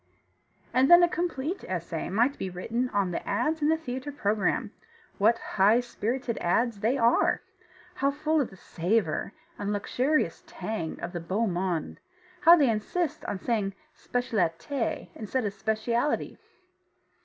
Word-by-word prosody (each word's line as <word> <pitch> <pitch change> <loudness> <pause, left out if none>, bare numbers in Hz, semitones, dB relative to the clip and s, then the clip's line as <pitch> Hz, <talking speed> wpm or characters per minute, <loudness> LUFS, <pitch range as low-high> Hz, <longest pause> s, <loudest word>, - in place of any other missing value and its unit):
And 260 +2 +4
then 345 0 +9
a - - +6
complete 340 -1 -2
essay 170 -3 -3
might 240 +8 +2
be 190 - -2
written 230 +8 -2
on 200 -5 0
the - - -2
ads 305 +10 0
in 295 - +3
the 320 - +3
theatre 260 -2 -5
program 210 -7 0 0.5
what 225 +3 +4
high 210 +3 +3
spirited 245 0 -3
ads 225 +5 +1
they 230 +6 +1
are! 235 -1 +3 0.5
How 275 -6 +1
full 305 +2 +1
of 260 - -2
the - - -14
savour 180 -1 -1 0.3
and 205 0 -2
luxurious 255 +8 0
tang 215 -8 -4
of 175 +1 -5
the 175 - -3
beau 190 +7 -1
monde! 180 -4 -2 0.4
How 340 0 +8
they 280 -8 +4
insist 305 +9 -2
on 200 - -2
saying 200 -2 -1 0.2
specialité 225 - -2
instead 225 +3 -2
of 200 - -2
specialty! 230 +6 -1
230 Hz, 145 wpm, -28 LUFS, 195-275 Hz, 0.5 s, then